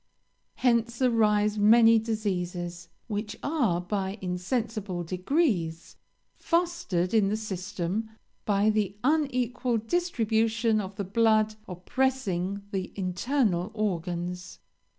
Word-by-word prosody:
Hence 235 -2 +1
arise 215 -4 +2
many 225 +2 +6
diseases, 180 -6 -3 0.2
which 210 -1 -4
are, 255 - +1
by 190 +2 -3
insensible 190 0 -2
degrees, 180 - -1 0.4
fostered 335 - 0
in 215 -3 +4
the 210 - 0
system 205 0 -3 0.3
by 205 +1 +2
the 205 -2 -1
unequal 255 -4 +1
distribution 225 -5 +1
of 195 0 -7
the 200 - -3
blood 215 +2 +3
oppressing 200 -1 -1
the 190 -3 -3
internal 190 0 0
organs. 180 -3 -3
210 Hz, 95 wpm, -27 LUFS, 185-230 Hz, 0.4 s, many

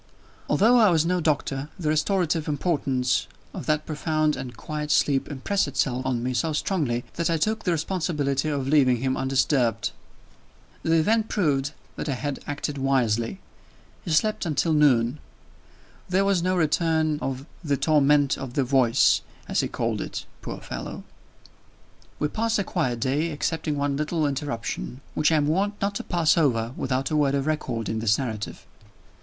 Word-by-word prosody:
Although 240 +4 +5
I 215 -3 +6
was 165 -2 +3
no 180 +1 +1
doctor, 145 -2 -1
the 165 -5 -1
restorative 165 0 +1
importance 135 -5 0 0.3
of - - -7
that 155 -1 +1
profound 155 0 0
and 125 -2 -7
quiet 150 -1 -5
sleep 145 -2 +2
impressed 155 +8 0
itself 130 -2 -1
on 120 -2 -1
me 130 +1 -1
so 155 +6 0
strongly, 145 -8 -1
that 170 0 0
I 165 - +2
took 220 +7 0
the 180 - +2
responsibility 155 -4 -1
of 140 -3 -2
leaving 135 -4 +4
him 130 +2 -1
undisturbed. 130 -3 +1 0.9
The 160 - +1
event 215 +7 +3
proved 145 -7 0 0.2
that 150 - -3
I 135 - 0
had 145 +2 -3
acted 145 0 -3
wisely. 130 - 0 0.6
He 180 - -6
slept 210 +7 +2
until 160 0 +1
noon. 135 -3 +3 0.9
There 190 +2 +2
was 195 -3 +2
no 185 +1 +1
return 160 -1 +1
of 135 -1 -4 0.2
"the 145 -3 0
torment 145 -1 +3
of 130 -3 -6
the 140 - +2
voice" 125 -3 +4 0.3
as - - 0
he - - +1
called - - -2
it, - - -5 0.2
poor - - -6
fellow. 60 -1 -6 1.1
We 150 - 0
passed 225 +7 0
a 200 - +1
quiet 120 -8 -1
day, 145 +6 0
excepting 155 0 -2
one 140 -1 0
little 155 +1 0
interruption, 135 -2 -3
which 155 +1 +2
I - - +4
am 150 -2 +2
warned 195 +7 +1
not 200 +1 0
to - - -4
pass 170 -1 +2
over 120 -6 +1
without 130 +2 -1
a - - +1
word 140 -2 +2
of 140 -1 -1
record 130 -8 -2
in 110 - -2
this 110 -1 +2
narrative. 110 -6 -5
150 Hz, 170 wpm, -25 LUFS, 130-165 Hz, 1.1 s, I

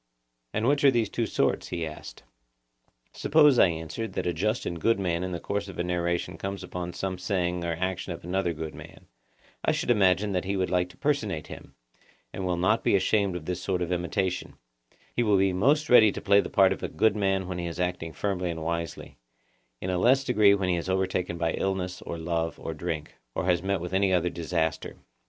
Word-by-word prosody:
And 110 - 0
which 145 +1 +2
are 140 - +8
these 115 -5 +1
two 115 -2 -1
sorts? - - 0
he 85 -2 -3
asked. 75 -1 -9 0.9
Suppose, 150 -4 +4
I - - +7
answered, 80 +7 -4
that - - -2
a 90 - 0
just 105 +8 -1
and 85 -2 -4
good 115 +1 +3
man 90 -2 -1
in 90 - -3
the 85 - -3
course 100 +4 -3
of 95 - -9
a 85 - 0
narration 85 -1 -2
comes 95 0 -4
on 90 -1 -5
some 95 -1 -3
saying 90 -2 -1
or 85 -1 -1
action 95 +2 -3
of 85 0 -7
another 90 +1 0
good 80 -1 -6
man,—I - - -8
should - - 0
imagine 100 -1 +3
that 90 -1 -1
he 100 +1 -1
will 95 - +1
like 90 0 +1
to - - -17
personate 110 - -1
him, - - -11 0.6
and 95 -1 -3
will 90 -1 0
not 95 +6 +2
be - - +3
ashamed 100 -1 +2
of 85 -3 -6
this 90 +1 -3
sort 90 -1 -1
of 85 - -4
imitation: 90 +1 -2 0.6
he - - +2
will 105 -4 +3
be 95 0 +2
most 145 +11 +2
ready 110 -4 +7
to - - -5
play 100 0 +4
the - - -6
part 95 -1 +4
of - - -8
the - - -4
good 110 -1 +2
man 95 -2 0
when 90 -1 -4
he 85 - -3
is 85 +1 -6
acting 90 -2 -2
firmly 90 0 -2
and 80 -1 -4
wisely; 85 -5 -4 0.6
in 95 - -3
a 90 - 0
less 130 +7 +4
degree 105 -6 +5
when 95 -2 -1
he 90 - +2
is 85 +2 -4
overtaken 95 -2 -1
by 85 -1 0
illness 95 -2 -2
or 85 - -5
love 80 -1 -2
or 80 - -5
drink, 80 -1 -4 0.2
or - - -1
has 90 -2 +2
met 100 0 0
with 90 +2 -6
any 95 0 +3
other 90 -1 +2
disaster. 80 -2 -2
90 Hz, 220 wpm, -27 LUFS, 85-100 Hz, 0.9 s, are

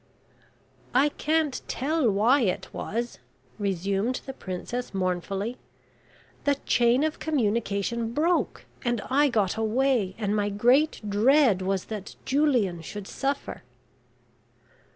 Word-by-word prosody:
"I 280 +4 +5
can't 305 -2 0
tell 290 -2 +1
why 225 +8 +4
it 190 -3 -1
was," 235 +3 -4 0.4
resumed 200 +4 -1
the 265 - -6
Princess, 205 +3 -5
mournfully. 190 +5 -2 0.9
"The 285 -1 +3
chain 245 +3 +3
of 315 0 -1
communication 230 -4 0
broke, 330 +7 0 0.2
and 240 -3 0
I 285 +2 +4
got 210 -5 +1
away, 225 -3 +1
and 210 -2 -1
my 205 -1 +1
great 245 +9 +3
dread 225 0 +4
was 190 0 -1
that 210 -2 -7
Julian 250 - +2
should 200 +4 -7
suffer." 275 +1 -3
235 Hz, 110 wpm, -26 LUFS, 200-270 Hz, 0.9 s, I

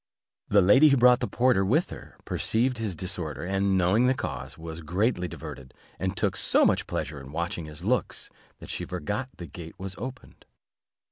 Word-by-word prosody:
The 100 -2 +5
lady 130 +11 +7
who 140 - +4
brought 125 0 +6
the 120 - -1
porter 120 -1 +2
with 140 - +1
her, - - -11
perceiving 120 +1 0
his 105 -5 -2
disorder, 85 -3 -3
and 95 +1 +1
knowing 95 +7 +3
the 130 - +3
cause, 70 - -5
was 80 0 -7
greatly 90 +4 0
diverted, 65 -6 -9 0.2
and 95 0 -2
took - - 0
so - - +4
much - - +2
pleasure 75 0 -4
in 70 +1 -11
watching 85 +1 -3
his 75 +2 -9
looks, 115 0 -1 0.3
that - - -8
she - - -3
forgot 105 - -3
the 85 - -7
gate 80 +1 -10
was 95 -1 -6
opened. 130 +3 -9
95 Hz, 185 wpm, -27 LUFS, 85-120 Hz, 0.3 s, lady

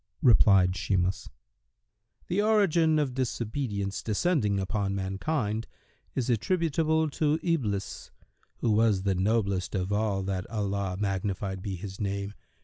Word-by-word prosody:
Replied 100 -6 +6
Shimas, 95 0 -1 1.0
"The 185 +4 0
origin 175 -7 +3
of 145 -4 0
disobedience 115 -5 -2
descending 105 - +1
upon 95 +1 -1
mankind 105 +4 -2 0.5
is 125 - -1
attributable 160 - +1
to 155 +1 +1
Iblis, 110 - -2 0.5
who 115 - +2
was 105 -3 +3
the 100 -1 +1
noblest 100 0 0
of 95 +1 -1
all 105 -2 0
that 95 -1 -3
Allah 100 -4 -2
(magnified 95 -1 -2
be 95 0 -4
His 95 +1 -8
name!) 100 0 -2
105 Hz, 120 wpm, -28 LUFS, 95-135 Hz, 1.0 s, Replied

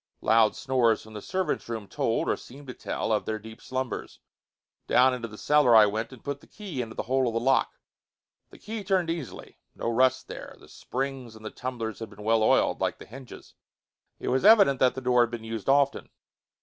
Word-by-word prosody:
Loud 110 -1 +4
snores 125 -4 +1
from 110 - -14
the 105 - -7
servants' 185 - -2
room 110 -3 -5
told, - - -1
or - - +2
seemed 140 +3 -13
to 125 - -7
tell, - - -3
of 105 - +1
their 110 - -2
deep 110 +1 -12
slumbers. 130 -1 -4 0.7
Down 130 +1 +5
into 120 -2 -4
the 105 -1 -12
cellar 145 -4 +4
I 110 -1 +9
went 110 +4 -2
and 130 - -13
put 140 0 -4
the - - -18
key 190 -11 -6
into 110 -2 -7
the - - -3
hole 130 +1 +1
of 115 - -2
the - - +2
lock. 130 +3 +1 0.7
The - - -15
key 215 0 -6
turned 185 -4 +1
easily 165 -8 -7 0.2
no 115 - -2
rust 130 +2 +2
there - - -9
the - - -17
springs 130 -3 -5
and 110 0 -13
the 110 - -5
tumblers 120 -3 -5
had 115 -2 -6
been 105 0 -12
well 110 +1 +2
oiled, 110 - +2
like - - 0
the - - -12
hinges. 130 +2 -12 0.7
It - - -3
was 130 +1 +1
evident 200 - +6
that 130 -1 +3
the 130 - -5
door 125 -1 +3
had 120 - +2
been 120 -1 -6
used 115 +1 -5
often. 140 0 +2
125 Hz, 215 wpm, -27 LUFS, 110-135 Hz, 0.7 s, I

